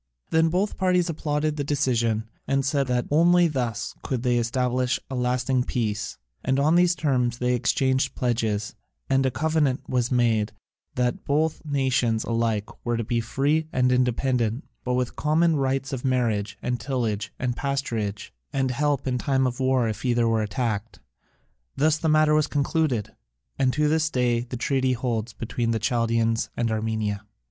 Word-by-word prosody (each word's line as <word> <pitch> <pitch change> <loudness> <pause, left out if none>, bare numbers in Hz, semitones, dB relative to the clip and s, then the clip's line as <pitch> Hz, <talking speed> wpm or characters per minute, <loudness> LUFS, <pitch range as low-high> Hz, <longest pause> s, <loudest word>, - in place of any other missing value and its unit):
Then 160 0 +4
both 190 +5 0
parties 180 -2 +2
applauded 150 0 -1
the 145 - -1
decision, 120 -6 0 0.2
and 135 0 +1
said 140 -1 +1
that 125 -1 0
only 175 +3 +5
thus 120 -7 -2
could 125 -3 -3
they 125 -1 +2
establish 125 +1 0
a - - -2
lasting 125 +1 +1
peace, 110 - -2 0.3
and 135 +1 +1
on 150 +3 +3
these 175 0 +4
terms 125 -7 0
they 125 0 +1
exchanged 130 +2 +1
pledges, 110 -4 -1 0.4
and 135 0 +3
a - - +2
covenant 150 -1 0
was 125 -1 0
made 115 -4 +2 0.4
that 125 -1 0
both 155 +2 0
nations 130 -6 +1
alike 115 -3 0 0.2
were 120 -1 0
to 115 - -1
be 115 +2 0
free 145 +7 0
and 125 0 +2
independent, 125 0 +1 0.2
but 125 0 0
with 125 -1 -1
common 160 +2 +2
rights 135 -1 -1
of 130 - -4
marriage, 120 -6 0
and 125 -1 -1
tillage, 115 -5 -2
and 125 -2 -2
pasturage, 115 -8 -3 0.2
and 135 -2 0
help 145 +1 0
in 125 -2 0
time 135 +1 +1
of 125 0 -2
war 130 -2 +2
if 110 - -4
either 120 -2 +2
were 115 -1 +2
attacked. 110 -1 -3 0.8
Thus 155 +1 +3
the 160 - 0
matter 155 0 +4
was 150 0 +3
concluded, 140 -6 0 0.5
and 130 -1 +3
to 150 +1 +2
this 155 +1 +2
day 125 -4 +1
the 125 +1 -5
treaty 130 +1 +1
holds 115 -2 -2
between 115 +1 -3
the 115 -1 +1
Chaldaeans 115 0 +1
and 115 -1 0
Armenia. 110 -2 -1
125 Hz, 165 wpm, -25 LUFS, 115-140 Hz, 0.8 s, only